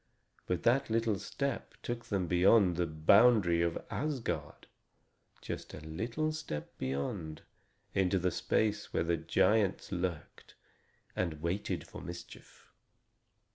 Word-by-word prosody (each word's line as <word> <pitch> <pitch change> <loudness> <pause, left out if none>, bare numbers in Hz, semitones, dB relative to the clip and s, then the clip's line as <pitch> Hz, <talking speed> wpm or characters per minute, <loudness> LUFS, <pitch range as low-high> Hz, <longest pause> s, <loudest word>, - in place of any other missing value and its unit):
But 90 -2 -1
that 130 +3 +3
little 110 -3 +1
step 140 +4 -3
took 120 -1 -4
them 95 -3 -1
beyond 90 +2 +5
the 85 0 0
boundary 85 +3 +5
of 85 -1 +1
Asgard 115 - -3 0.8
just - - -6
a - - -8
little 115 - -2
step 155 - -6
beyond, 75 +5 -3 0.5
into 95 0 +2
the 90 0 +1
space 105 +3 0
where - - +2
the 85 0 +1
giants 100 +6 +2
lurked 90 -4 -4 0.6
and 85 -4 -1
waited 85 +5 -2
for - - -9
mischief. 85 0 -11
90 Hz, 120 wpm, -32 LUFS, 85-115 Hz, 0.8 s, beyond